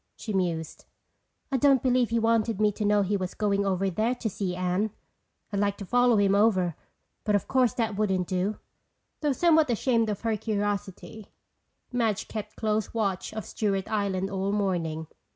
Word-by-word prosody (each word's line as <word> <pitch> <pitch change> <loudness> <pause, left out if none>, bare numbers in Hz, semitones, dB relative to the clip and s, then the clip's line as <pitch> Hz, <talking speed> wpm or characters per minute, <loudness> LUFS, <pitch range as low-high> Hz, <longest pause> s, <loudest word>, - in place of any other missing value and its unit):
she 215 - -6
mused. 170 -4 -2 0.7
"I 270 - +2
don't 270 -1 +4
believe 250 -2 +3
he 230 - +1
wanted 225 -2 +1
me 210 -1 +4
to 210 - -4
know 205 0 +3
he 200 +2 0
was 185 -2 -3
going 200 -1 +1
over 195 0 +1
there 220 +7 0
to 240 -2 -3
see 185 -2 -3
Anne. 185 +4 0 0.6
I'd 200 - 0
like 200 0 +1
to 200 - -7
follow 245 +2 +4
him 200 -1 +3
over 190 -5 +3 0.5
but 210 -1 +2
of 205 - 0
course 255 -2 +2
that 225 -4 -1
wouldn't 190 -3 +1
do." 190 +3 -1 0.6
Though 295 -2 +1
somewhat 320 -1 +4
ashamed 230 -1 +1
of 205 - -3
her 225 -1 0
curiosity, 205 0 -3 0.7
Madge 225 -4 0
kept 215 -1 -6
close 215 0 -1
watch 195 -4 -1
of 215 -3 -5
Stewart 195 -3 -1
Island 195 -2 -1
all 195 0 -1
morning. 175 -6 -1
210 Hz, 175 wpm, -27 LUFS, 195-225 Hz, 0.7 s, don't